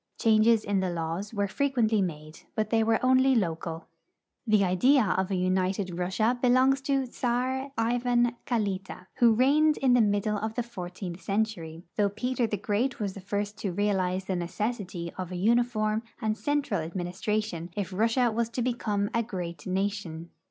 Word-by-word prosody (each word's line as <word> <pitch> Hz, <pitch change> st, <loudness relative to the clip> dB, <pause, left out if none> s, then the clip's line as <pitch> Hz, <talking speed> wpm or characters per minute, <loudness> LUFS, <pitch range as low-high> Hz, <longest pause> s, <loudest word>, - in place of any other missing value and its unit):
Changes 220 Hz, 0 st, +4 dB
in 200 Hz, -1 st, 0 dB
the 190 Hz, -1 st, 0 dB
laws 170 Hz, +4 st, -3 dB
were 205 Hz, -2 st, -1 dB
fre 280 Hz, +8 st, -1 dB
quently 225 Hz, -6 st, +2 dB
made, 155 Hz, -3 st, -6 dB, 0.2 s
but 215 Hz, -1 st, -1 dB
they 225 Hz, -1 st, +3 dB
Avere 225 Hz, 0 st, +2 dB
only 260 Hz, +1 st, +4 dB
local. 165 Hz, -5 st, -2 dB, 0.6 s
The 215 Hz, -2 st, +4 dB
idea 245 Hz, +10 st, +4 dB
of 190 Hz, 0 st, 0 dB
an 190 Hz, -, 0 dB
united 185 Hz, 0 st, 0 dB
Russia 215 Hz, +7 st, +1 dB
belongs 260 Hz, +2 st, +4 dB
to 270 Hz, -1 st, +2 dB
Czar 255 Hz, +2 st, -2 dB
Ivan 240 Hz, +1 st, +1 dB
Kalita, 195 Hz, -5 st, -2 dB, 0.2 s
Avho 230 Hz, -2 st, +6 dB
reigned 300 Hz, +4 st, +4 dB
in 260 Hz, -2 st, +3 dB
the 245 Hz, -, +5 dB
middle 205 Hz, 0 st, +1 dB
of 220 Hz, +1 st, -4 dB
the 245 Hz, -, -1 dB
fourteenth, 185 Hz, -5 st, -7 dB
century, 190 Hz, -6 st, -2 dB
though 205 Hz, -1 st, +3 dB
Peter 240 Hz, +4 st, -1 dB
the 210 Hz, -, -2 dB
Great 225 Hz, +6 st, -1 dB
was 200 Hz, -3 st, -2 dB
the 195 Hz, -, -9 dB
first 205 Hz, +2 st, -3 dB
to 200 Hz, -4 st, -2 dB
realize 190 Hz, -2 st, 0 dB
the 190 Hz, -, -1 dB
necessity 180 Hz, -1 st, -3 dB
of 185 Hz, -1 st, -4 dB
a -, -, -4 dB
uniform 215 Hz, +1 st, +1 dB, 0.2 s
and 215 Hz, 0 st, 0 dB
central 285 Hz, -6 st, -1 dB
administration 175 Hz, +2 st, -3 dB
if 195 Hz, -2 st, -3 dB
Russia 230 Hz, +4 st, +2 dB
was 230 Hz, +1 st, -1 dB
to 240 Hz, +1 st, -2 dB
become 210 Hz, -5 st, -1 dB
a 230 Hz, -, +2 dB
great 180 Hz, -7 st, -6 dB
nation. 185 Hz, -4 st, -3 dB
210 Hz, 170 wpm, -28 LUFS, 185-240 Hz, 0.6 s, Avho